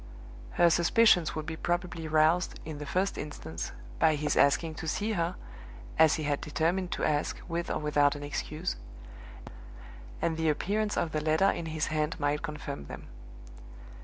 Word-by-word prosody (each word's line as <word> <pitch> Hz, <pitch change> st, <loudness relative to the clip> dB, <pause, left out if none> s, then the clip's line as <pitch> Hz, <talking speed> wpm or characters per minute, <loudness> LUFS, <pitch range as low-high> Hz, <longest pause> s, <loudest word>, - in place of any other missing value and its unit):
Her 170 Hz, -1 st, +5 dB
suspicions 175 Hz, 0 st, +4 dB
would 155 Hz, -1 st, -3 dB
be 160 Hz, +1 st, -4 dB
probably 175 Hz, -1 st, -2 dB
roused, 155 Hz, +3 st, +2 dB
in 155 Hz, -2 st, -6 dB
the 150 Hz, -, -6 dB
first 185 Hz, +6 st, 0 dB
instance, 85 Hz, -, -6 dB, 0.3 s
by 160 Hz, -1 st, +4 dB
his 150 Hz, 0 st, -1 dB
asking 150 Hz, +3 st, +3 dB
to 160 Hz, -, -5 dB
see 210 Hz, +7 st, -1 dB
her 175 Hz, -2 st, -1 dB, 0.6 s
(as 160 Hz, -1 st, +6 dB
he 155 Hz, -, -3 dB
had 145 Hz, -1 st, -1 dB
determined 170 Hz, +4 st, 0 dB
to -, -, -3 dB
ask, 150 Hz, -1 st, 0 dB
with 170 Hz, 0 st, -3 dB
or -, -, 0 dB
without 145 Hz, -1 st, +2 dB
an 145 Hz, -, -7 dB
excuse), 155 Hz, +4 st, -3 dB, 1.4 s
and 165 Hz, -1 st, 0 dB
the 160 Hz, -1 st, +1 dB
appearance 205 Hz, +7 st, 0 dB
of 165 Hz, -, 0 dB
the 155 Hz, -, -1 dB
letter 160 Hz, +6 st, +3 dB
in 165 Hz, -, -4 dB
his 155 Hz, -1 st, -1 dB
hand 155 Hz, +2 st, -1 dB
might 145 Hz, 0 st, 0 dB
confirm 150 Hz, -, -6 dB
them. -, -, -9 dB
160 Hz, 165 wpm, -29 LUFS, 150-175 Hz, 1.4 s, as